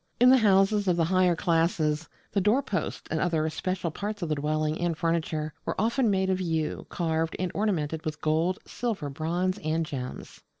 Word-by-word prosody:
In 250 +1 +7
the 260 - +7
houses 200 -1 +4
of 175 -2 +3
the 165 - +3
higher 185 0 +3
classes 165 -2 +1 0.2
the 200 - +1
doorposts 210 0 0
and 160 - 0
other 160 -2 +1
special 180 +1 -2
parts 205 +3 -4
of 165 - -2
the - - +2
dwelling 155 +2 -1
and 170 -2 0
furniture 160 -2 -1
were - - -3
often 235 +3 +2
made 190 -1 +1
of 185 0 0
yew, 160 -3 -2
carved, 165 -1 -1
and 185 -1 -2
ornamented 160 -7 -1
with 155 -2 -4
gold, 160 +4 +1
silver, 205 - -3
bronze, 175 +6 -1
and 160 +1 -1
gems. 130 -4 -7
170 Hz, 180 wpm, -27 LUFS, 155-190 Hz, 0.2 s, In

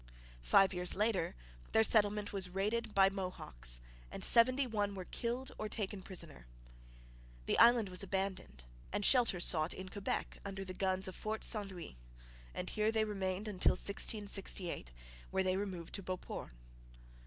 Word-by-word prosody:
Five 130 - +5
years 180 0 -2
later 210 - +1 0.4
their 220 - +5
settlement 210 -2 +2
was 190 -2 0
raided 210 +4 -2
by 195 0 +6
Mohawks 60 - 0 0.3
and - - -6
seventy 255 +4 +5
one 205 -4 -1
were 185 -1 -6
killed 245 +6 -3
or 215 - -3
taken 205 -2 -3
prisoner. 170 - -6 1.0
The - - +2
island 235 -2 +6
was 180 0 -3
abandoned 190 - -3 0.3
and 205 - 0
shelter 240 -8 +5
sought 160 -2 +2
in 185 0 -7
Quebec 200 +1 -3
under 195 -1 -5
the 185 - -6
guns 190 0 0
of 185 - -7
Fort 215 +1 -4
St 210 -3 +1
Louis, 175 - -9 0.5
and - - -5
here 215 +1 +1
they 220 -1 +1
remained 195 -1 -3
until 200 -4 +2
1668, 200 - -1 0.4
when 190 0 0
they 185 0 +2
removed 190 -4 -4
to 200 - -1
Beauport. 185 -1 -6
195 Hz, 155 wpm, -35 LUFS, 185-215 Hz, 1.0 s, by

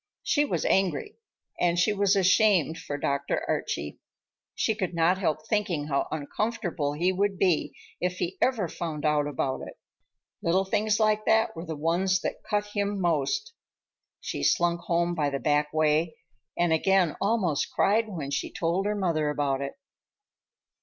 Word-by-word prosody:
She 295 -1 +2
was - - -2
angry, 195 - 0 0.4
and 175 -1 +2
she 195 +5 +3
was 200 -1 +2
ashamed 185 -4 +3
for 145 -2 -5
Dr. 140 0 -1
Archie. 75 0 -3 0.6
She 220 - +1
could 185 -5 -3
not 170 +3 +3
help 155 -4 -1
thinking 175 -9 -1
how 140 -1 0
uncomfortable 170 -1 -2
he 175 +5 +1
would 195 +1 0
be 180 -5 +1 0.2
if 180 0 0
he 180 0 -3
ever 230 -8 +2
found 155 -3 -5
out 150 -1 +2
about 135 -2 -2
it. - - -9 0.7
Little 185 +3 +2
things 210 +1 +1
like 215 -1 +2
that 220 -3 +3
were 165 +2 -7
the 160 - -4
ones 175 +5 +1
that - - -4
cut 210 -1 -1
him 205 -1 -1
most. 160 -6 0 0.7
She - - -5
slunk 170 - +2
home 170 0 0
by 150 -4 0
the 140 - -2
back 150 +1 +1
way, 155 +1 +1 0.4
and 175 -1 +2
again 180 -1 +2
almost 195 -8 +1
cried 220 +2 +2
when 155 -8 -5
she - - -2
told 175 +4 -1
her 210 - 0
mother 165 -6 0
about 140 -2 -1
it. 140 - -4
175 Hz, 160 wpm, -27 LUFS, 150-200 Hz, 0.7 s, she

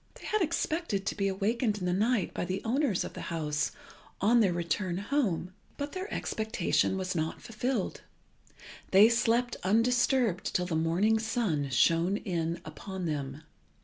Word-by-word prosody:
They - - -12
had 430 -1 0
expected 315 - -1
to - - -1
be 200 -1 0
awakened 210 +3 0
in 185 - -4
the 180 - +1
night 215 0 +1
by - - -2
the 185 +2 -3
owners 245 -4 +1
of - - -7
the - - -7
house 150 -4 -1 0.5
on 230 +5 +4
their 200 -5 +4
return 175 +1 -1
home, 200 - -1 0.2
but 285 0 -4
their 375 +2 -5
expectation 215 -3 0
was 185 -1 -2
not 160 -2 -2
fulfilled. 230 -1 -2 0.9
They 200 +4 +7
slept 235 +1 +1
undisturbed 230 0 +2
till 180 - +2
the 175 -3 -2
morning 175 +8 +2
sun 215 - -1
shone 165 +8 +3
in 170 -4 -2
upon 185 +4 -6
them. 145 -1 -3
195 Hz, 155 wpm, -30 LUFS, 170-230 Hz, 0.9 s, They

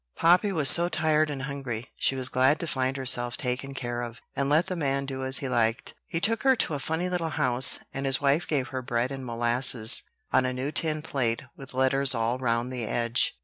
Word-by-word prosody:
Poppy 180 +5 +3
was 155 -7 +1
so 170 +4 +7
tired 155 -2 +1
and 140 -2 -5
hungry, 130 -4 -6
she 135 - 0
was 130 -1 0
glad 130 +4 +2
to - - -3
find 130 -3 -2
herself 120 -2 0
taken 135 +1 -4
care 120 -2 -4
of, 120 -1 -7 0.2
and 140 0 -1
let 155 +4 +3
the 185 - -4
man 140 -4 -1
do 135 -1 -5
as 130 0 +2
he 135 - -4
liked. 115 -2 -1
He 165 - -3
took 220 +4 +1
her 265 -1 +4
to 165 - -1
a 145 - -3
funny 160 +6 -2
little 175 -3 -2
house, 125 -3 +3 0.2
and 135 0 -3
his 135 - +2
wife 145 +4 +1
gave 135 -5 -1
her 130 - -4
bread 120 0 -1
and 135 -1 -6
molasses 120 -1 +3 0.3
on 130 - +3
a 130 0 -2
new 130 +3 -4
tin 155 0 -1
plate 125 -6 -2
with 135 -2 -11
letters 130 +1 +2
all 115 +2 -1
round 120 0 -1
the 125 -2 -4
edge. 115 +1 0
135 Hz, 225 wpm, -26 LUFS, 125-150 Hz, 0.3 s, so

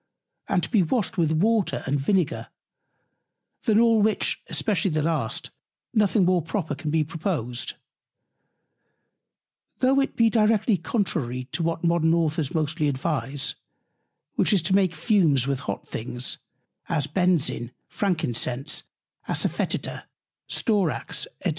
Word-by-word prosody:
and 185 -4 +2
to - - -3
be 215 -5 +5
washed 200 +5 0
with 160 -2 +3
Water 205 +6 +1
and 140 +1 0
Vinegar; 180 +3 0 1.2
than 220 -3 +4
all 230 -2 +5
which, 215 0 +1
especially 205 -2 +1
the 155 -2 0
last, 160 0 -1 0.4
nothing 210 -3 +3
more 180 -1 +3
proper 165 -1 -3
can 150 +1 -4
be 155 0 +2
proposed: 155 - -3 2.0
Though 265 +1 +3
it 275 - 0
be 230 - +4
directly 220 -1 +3
contrary 155 - -1
to - - -2
what 165 +1 -1
Modern 170 -1 +3
Authors 160 -3 0
mostly 155 -1 0
advise, 140 0 -1 0.8
which - - +2
is 190 -5 +3
to 190 +3 +2
make 185 -4 +2
Fumes 160 - +3
with 140 -1 -1
hot 100 -7 -5
Things, 120 +2 -4 0.5
as 145 - +1
Benzoin, 170 -9 +1 0.2
Frankincense, 140 - -1 0.5
Asa - - 0
Fœtida, - - -3 0.4
Storax, 205 - 0 0.2
&c. - - +3
170 Hz, 130 wpm, -25 LUFS, 150-200 Hz, 2.0 s, be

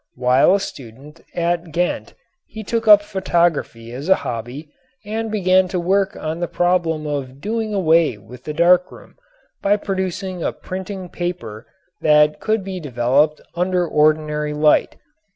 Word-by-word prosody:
While 125 +8 +4
a - - +1
student 140 - -10
at 170 -1 -1
Ghent 175 +3 -2 0.3
he 220 - -8
took 225 +2 -2
up 205 -1 +8
photography 170 - -1
as 140 +8 -6
a 190 - +7
hobby 125 +6 -6 0.3
and 220 +2 -3
began 185 -3 +3
to 180 0 -2
work 195 +3 +1
on 155 +2 -4
the 175 - -2
problem 175 -4 0
of 140 -3 -4
doing 220 +4 -3
away 165 - +3
with 120 +5 -14
the 150 - -4
dark 180 +2 +4
room - - -15 0.5
by 205 +1 +2
producing 190 -2 -4
a - - -1
printing 190 0 -7
paper 175 -12 -6 0.3
that 150 0 +4
could 220 -2 0
be 190 -1 -5
developed 140 +2 +1
under 180 0 0
ordinary 150 -1 +1
light. 150 0 +2
170 Hz, 150 wpm, -20 LUFS, 150-190 Hz, 0.5 s, up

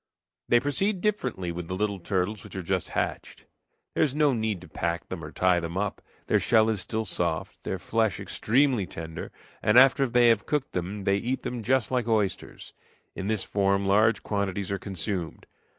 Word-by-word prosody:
They 120 - +6
proceed 185 - 0
differently 125 - -1
with 85 0 -6
the 95 - -3
little 100 0 -1
turtles 95 +3 -2
which - - -11
are 95 - -4
just 95 0 -1
hatched. - - -3 0.5
There - - +2
is 145 -3 0
no 150 -2 +3
need 110 -4 -1
to - - -12
pack 85 0 -3
them 90 -3 -5
or 75 - -7
tie 90 0 +3
them 85 +1 -5
up. 100 0 -2 0.2
Their - - +3
shell 110 -1 +4
is 105 - -1
still 110 0 -2
soft, 85 -5 -2
their - - -2
flesh 110 -4 0
extremely 125 -4 +1
tender, 80 0 -7 0.3
and 105 +3 +4
after 135 +1 +6
they 120 0 +5
have 110 -3 +2
cooked 150 -3 -1
them 95 +3 -4
they 100 +1 +2
eat 125 +6 -2
them 120 -1 -4
just 130 +3 +1
like 125 -3 0
oysters. 105 -5 -2 0.4
In 95 - -4
this 110 -2 0
form 100 0 +1
large 110 +3 +3
quantities 100 -2 -2
are 100 - -1
consumed. 95 -2 -4
105 Hz, 190 wpm, -27 LUFS, 95-120 Hz, 0.5 s, They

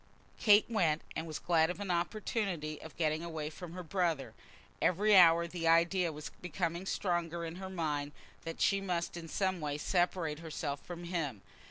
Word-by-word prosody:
Kate 210 -2 +6
went, 170 -9 +1
and 160 +1 -3
was 155 -2 -4
glad 165 -2 +3
of 180 - -4
an 200 -3 -2
opportunity 175 - -2
of 160 - -11
getting 155 0 0
away 160 -2 -4
from 170 +1 -9
her 180 0 -6
brother. 170 -4 -1 0.5
Every 205 +4 +4
hour 170 -2 +7
the 170 -1 -3
idea 170 +1 +4
was 150 0 -7
becoming 175 +1 -2
stronger 170 -3 -1
in 165 +1 -6
her 190 0 -6
mind 150 -5 -2 0.3
that 165 0 -6
she 195 -1 +3
must 175 -3 -2
in 170 -1 -7
some 185 0 -1
way 145 -1 -2
separate 175 -1 0
herself 150 -3 -4
from 175 -1 -7
him. 160 - -3
170 Hz, 175 wpm, -33 LUFS, 160-180 Hz, 0.5 s, hour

